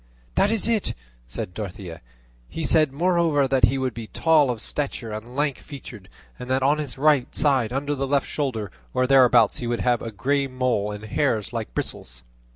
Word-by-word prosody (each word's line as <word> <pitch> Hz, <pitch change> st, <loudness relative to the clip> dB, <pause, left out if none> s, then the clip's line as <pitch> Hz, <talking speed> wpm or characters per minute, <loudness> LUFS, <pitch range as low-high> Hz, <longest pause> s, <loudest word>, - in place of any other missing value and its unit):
"That 200 Hz, -, +3 dB
is 225 Hz, -1 st, 0 dB
it," 225 Hz, -3 st, 0 dB, 0.3 s
said 90 Hz, +8 st, -6 dB
Dorothea; 90 Hz, -4 st, -7 dB, 0.5 s
"he 165 Hz, -, -5 dB
said, 155 Hz, -1 st, +3 dB
moreover, 165 Hz, -2 st, +2 dB
that 130 Hz, -2 st, +4 dB
he 135 Hz, +4 st, 0 dB
would 130 Hz, -2 st, -1 dB
be 115 Hz, 0 st, -7 dB
tall 155 Hz, -1 st, +3 dB
of 120 Hz, -3 st, -2 dB
stature 130 Hz, -3 st, -3 dB
and 110 Hz, +4 st, -7 dB
lank 145 Hz, -1 st, 0 dB
featured; 120 Hz, -8 st, -11 dB, 0.3 s
and 125 Hz, -, -8 dB
that 130 Hz, 0 st, +1 dB
on 145 Hz, +3 st, +3 dB
his 145 Hz, -4 st, -5 dB
right 145 Hz, -2 st, +3 dB
side 135 Hz, -6 st, +2 dB
under 140 Hz, +3 st, -1 dB
the 135 Hz, -1 st, -2 dB
left 140 Hz, 0 st, +1 dB
shoulder, 115 Hz, -, -3 dB, 0.2 s
or 130 Hz, -, +3 dB
thereabouts, 125 Hz, -4 st, +5 dB
he 120 Hz, -, -4 dB
would 120 Hz, 0 st, -1 dB
have 120 Hz, -2 st, +1 dB
a 115 Hz, -, -5 dB
grey 135 Hz, +6 st, 0 dB
mole 125 Hz, -5 st, 0 dB
with 105 Hz, 0 st, -6 dB
hairs 110 Hz, -4 st, -1 dB
like -, -, -5 dB
bristles." -, -, -5 dB
130 Hz, 190 wpm, -24 LUFS, 115-145 Hz, 0.5 s, thereabouts